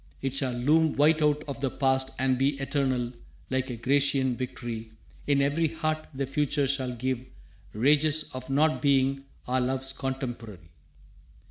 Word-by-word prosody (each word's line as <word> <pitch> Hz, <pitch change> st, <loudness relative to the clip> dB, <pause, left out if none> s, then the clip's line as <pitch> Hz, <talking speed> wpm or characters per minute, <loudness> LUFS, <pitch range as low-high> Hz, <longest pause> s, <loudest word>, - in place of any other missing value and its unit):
It 135 Hz, -1 st, -2 dB
shall 135 Hz, -2 st, 0 dB
loom 150 Hz, +6 st, +2 dB
white 155 Hz, +2 st, +4 dB
out 150 Hz, 0 st, +2 dB
of 140 Hz, -1 st, -5 dB
the 135 Hz, -1 st, 0 dB
past 130 Hz, 0 st, +1 dB
and 130 Hz, -1 st, +2 dB
be 135 Hz, +2 st, 0 dB
Eternal, 130 Hz, -3 st, -1 dB, 0.4 s
like 130 Hz, 0 st, 0 dB
a 125 Hz, -, -3 dB
Grecian 135 Hz, +1 st, +2 dB
victory, 120 Hz, -3 st, -5 dB, 0.4 s
In 140 Hz, -1 st, +3 dB
every 155 Hz, +4 st, +1 dB
heart 155 Hz, 0 st, -2 dB
the 135 Hz, -1 st, -3 dB
future 140 Hz, +1 st, 0 dB
shall 130 Hz, -2 st, -1 dB
give 130 Hz, +1 st, -2 dB, 0.5 s
rages 150 Hz, +6 st, +3 dB
Of 130 Hz, 0 st, -7 dB
not 155 Hz, +3 st, +2 dB
being 135 Hz, -1 st, +2 dB, 0.2 s
our 130 Hz, +1 st, +1 dB
love's 130 Hz, +1 st, -1 dB
contemporary. 120 Hz, -, -5 dB
135 Hz, 150 wpm, -27 LUFS, 130-145 Hz, 0.5 s, white